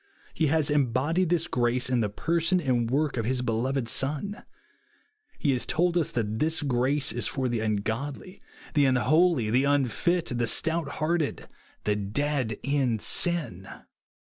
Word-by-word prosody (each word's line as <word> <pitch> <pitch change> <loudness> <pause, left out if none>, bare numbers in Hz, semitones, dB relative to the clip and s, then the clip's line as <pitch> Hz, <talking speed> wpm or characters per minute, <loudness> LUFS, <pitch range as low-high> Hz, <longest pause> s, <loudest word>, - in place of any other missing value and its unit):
He 160 - +1
has 155 0 +1
embodied 145 +6 +1
this 170 -2 +1
grace 125 +1 +1
in 125 -1 +1
the 105 -2 0
person 170 - +1
and 125 -7 0
work 145 +1 0
of 115 - -1
his 125 +1 0
be 115 - -1
loved 130 +2 -1
Son. 150 - -1 0.9
He 145 - +1
has 125 -2 0
told 175 +2 +1
us 170 -4 +1
that 110 -2 -2
this 160 0 +1
grace 135 +2 +1
i? - - -2
for 130 +1 -1
the 120 -2 -1
l^:lgodly. 110 - -3 0.3
the 145 -2 +4
unholy, 130 -1 +2
the 130 +4 +3
unfit, 145 - +1
the 120 -1 -1
stouthearted, 160 +2 0 0.4
the 105 - +1
dead 115 +3 -2
in 135 -5 +1
sin. 145 - 0
135 Hz, 150 wpm, -27 LUFS, 120-160 Hz, 0.9 s, the